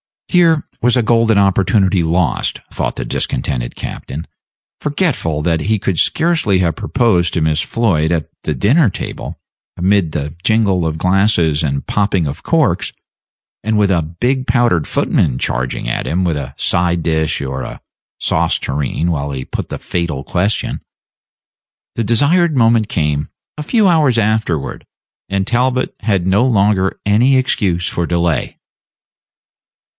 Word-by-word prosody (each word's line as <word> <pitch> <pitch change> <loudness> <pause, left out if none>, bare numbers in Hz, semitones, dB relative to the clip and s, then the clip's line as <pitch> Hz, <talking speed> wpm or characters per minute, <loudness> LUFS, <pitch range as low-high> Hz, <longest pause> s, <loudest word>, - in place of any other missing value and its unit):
Here 165 -4 +3 0.2
was 125 +1 +3
a 125 - +2
golden 115 -1 +3
opportunity 95 -1 +3
lost, 80 +1 0
thought - - -2
the - - -3
discontented - - -2
captain, 75 +5 -6 0.5
forgetful 145 - -1
that 80 0 +1
he 110 +1 +1
could 95 -3 -2
scarcely 160 - +2
have 85 -3 0
proposed 95 -9 +1
to 85 - 0
Miss 80 0 +1
Floyd 85 -8 +1
at 80 -2 -1 0.2
the 75 - -2
dinner 125 - +3
table, - - -6 0.4
amid 90 -3 +1
the 75 0 -3
jingle 100 -5 +2
of 80 0 -3
glasses 90 -4 +2
and 70 -3 -2
popping 100 -4 0
of 70 -1 -5
corks, - - +1 0.7
and 110 0 0
with 100 -2 +3
a 85 -3 +2 0.2
big 130 +1 0
powdered 115 - +2
footman 60 - +1
charging 65 -1 -2
at - - -2
him 90 +3 0
with 85 -4 0
a 70 -1 -6
side 85 +2 0
dish 80 -3 0
or 65 -1 -4
a - - -7 0.4
sauce - - +1
tureen 75 +4 -2
while 70 -3 -2
he 65 -1 -4
put - - -5
the - - -4
fatal 85 -6 -3
question. 95 +7 -1 1.1
The 115 - -1
desired 155 - +3
moment 115 -2 +3
came 75 -6 -1 0.3
a 150 - -4
few 215 - +2
hours 155 -9 +3
afterward, 110 -9 -1 0.4
and 95 0 0
Talbot 125 +2 0
had 100 -5 0
no 100 +6 +3
longer 100 -5 +2
any 120 +7 +4
excuse 95 -9 0
for 85 -1 -2
delay. 85 -2 -1
95 Hz, 145 wpm, -16 LUFS, 80-115 Hz, 1.1 s, any